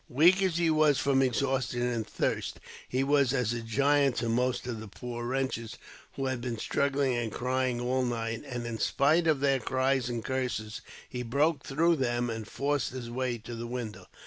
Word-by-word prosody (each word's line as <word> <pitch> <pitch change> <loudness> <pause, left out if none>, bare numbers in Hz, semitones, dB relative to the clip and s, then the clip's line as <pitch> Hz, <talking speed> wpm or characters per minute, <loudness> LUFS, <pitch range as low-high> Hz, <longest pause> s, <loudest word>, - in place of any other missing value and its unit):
Weak 170 +9 +5
as 185 -3 +1
he 170 -2 +3
was 155 -3 +4
from 135 +1 +2
exhaustion 130 -1 0
and 120 -3 -1
thirst, - - -2 0.3
he 130 +1 +1
was 140 -2 +3
as 125 -4 +1
a 120 - -3
giant 140 +3 +2
to 120 - -1
most 125 +2 0
of 120 -3 -4
the 110 - -8
poor 120 +3 -6
wretches, 130 -3 -2 0.4
who 135 - -3
had 130 -2 -1
been 120 -2 -3
struggling 140 +2 +1
and 120 -2 -2
crying 125 0 0
all 125 +2 0
night; 115 -2 -2
and, 120 -2 -4
in 115 -1 -4
spite 155 +5 +3
of 150 -4 +3
their 135 -1 +3
cries 130 +1 +1
and 115 -3 -4
curses, 120 -4 -2 0.3
he 125 - -5
broke 140 +5 +1
through 165 +4 +2
them 120 -2 0
and 110 -1 -5
forced 140 -1 -1
his 120 -2 -6
way 125 -1 -1
to 115 +2 -9
the 115 0 -5
window. 110 -7 -5
125 Hz, 195 wpm, -29 LUFS, 120-140 Hz, 0.4 s, Weak